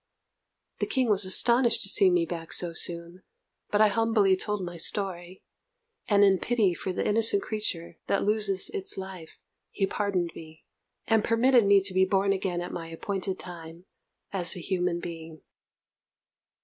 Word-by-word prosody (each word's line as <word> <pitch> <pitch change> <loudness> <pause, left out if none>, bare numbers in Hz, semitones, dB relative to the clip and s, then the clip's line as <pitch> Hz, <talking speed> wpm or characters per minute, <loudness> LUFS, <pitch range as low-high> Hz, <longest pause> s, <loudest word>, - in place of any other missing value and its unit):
The - - -1
King 255 -3 0
was 200 -1 +4
astonished 235 +5 +4
to - - +2
see 195 -1 +5
me 175 -2 +1
back 165 -1 -6
so 175 -2 +1
soon, 170 +2 -2 0.5
but 210 - +1
I 215 - +5
humbly 210 -2 +2
told 210 +1 -3
my 175 0 -8
story, 185 0 -3 0.6
and, 205 -1 +3
in 195 -2 +4
pity 220 -7 +1
for 185 - -5
the - - -3
innocent 215 -1 +3
creature 180 -6 -4
that 200 - 0
loses 205 -2 0
its 190 - -3
life, 190 -4 -9 0.3
he 195 - -1
pardoned 195 -4 -2
me, 160 0 -13 0.4
and 225 -2 +2
permitted 235 -1 +3
me 200 -1 +5
to 190 0 0
be 190 0 +3
born 195 +1 +1
again 185 -2 -3
at 175 - -7
my 165 -1 -6
appointed 190 +3 -4
time 170 0 -10 0.5
as 180 -3 +2
a - - -7
human 180 -1 -2
being. 165 -2 -9
190 Hz, 160 wpm, -26 LUFS, 175-205 Hz, 0.6 s, see